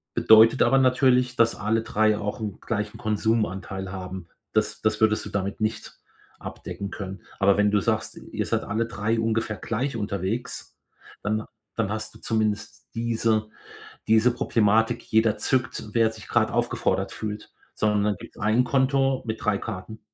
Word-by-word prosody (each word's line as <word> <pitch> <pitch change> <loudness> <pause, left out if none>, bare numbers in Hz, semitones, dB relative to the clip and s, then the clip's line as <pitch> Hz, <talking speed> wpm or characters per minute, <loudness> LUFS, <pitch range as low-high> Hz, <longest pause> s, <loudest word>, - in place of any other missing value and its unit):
Bedeutet 110 +3 +6
aber 135 - +4
natürlich, 125 -1 +3
dass 115 -2 +4
alle 110 +2 0
3 110 -1 +2
auch 105 +2 -4
'n 105 -2 -5
gleichen 105 -2 -3
Konsumanteil 105 -4 -1
haben. 95 -1 -7 0.3
Das - - 0
das 110 -1 +1
würdest 110 0 +3
du - - -6
damit 100 +1 -3
nicht 110 +1 -3 0.4
abdecken 100 - -6
können. 95 -2 -6 0.2
Aber 100 0 +5
wenn 105 0 +4
du 105 - +3
sagst, - - -1
ihr - - -4
seid - - 0
alle 110 +3 -1
3 115 0 -1
ungefähr 110 -1 -1
gleich 125 +6 -2
unterwegs, 105 +2 -3 0.5
dann 110 +1 -1 0.3
dann 110 -3 -1
hast 110 0 -4
du - - -14
zumindest 105 -2 -2
diese 115 -2 0 0.6
diese 110 +3 +5
Problematik, 110 +1 +2
jeder 110 -1 +2
zückt, 130 -2 -1
wer 115 -1 +4
sich 110 -1 -12
grad - - +2
aufgefordert - - 0
fühlt, 105 0 -6 0.2
sondern 105 -1 +1
dann 105 -1 +1
gibt's - - -12
1 110 +3 +2
Konto 135 +1 +2
mit 110 +1 -4
3 105 -2 +2
Karten. 110 +1 -7
110 Hz, 160 wpm, -25 LUFS, 105-115 Hz, 0.6 s, Bedeutet